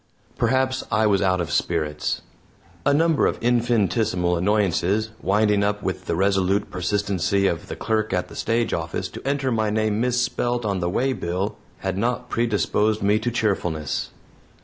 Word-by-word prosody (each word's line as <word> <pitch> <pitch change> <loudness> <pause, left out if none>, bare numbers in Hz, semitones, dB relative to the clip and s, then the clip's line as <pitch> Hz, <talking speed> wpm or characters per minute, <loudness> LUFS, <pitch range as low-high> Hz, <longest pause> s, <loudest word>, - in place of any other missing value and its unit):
Perhaps 130 0 +1
I 110 - +3
was 100 -2 +3
out 95 -1 +2
of 85 -4 -2
spirits. 75 -2 -1 0.6
A - - +5
number 160 +1 +3
of - - -1
infinitesimal 110 -6 +1
annoyances, 100 +2 +1
winding 105 +1 +2
up 105 0 -1
with - - -3
the - - -1
resolute 95 +2 +1
persistency 100 0 0
of 85 -4 -1
the - - -5
clerk 110 -1 -1
at 90 -1 0
the - - -12
stage 115 +1 0
office - - -2
to - - -9
enter 140 -2 0
my 110 -2 +1
name 110 0 0
misspelt 125 -1 0
on 100 -2 0
the 85 -1 -1
waybill, 100 -4 -1 0.3
had 95 0 -2
not 125 +2 -1
predisposed 110 -2 +1
me 105 +2 +3
to 120 +2 -1
cheerfulness. 90 - -1
105 Hz, 155 wpm, -23 LUFS, 95-115 Hz, 0.6 s, A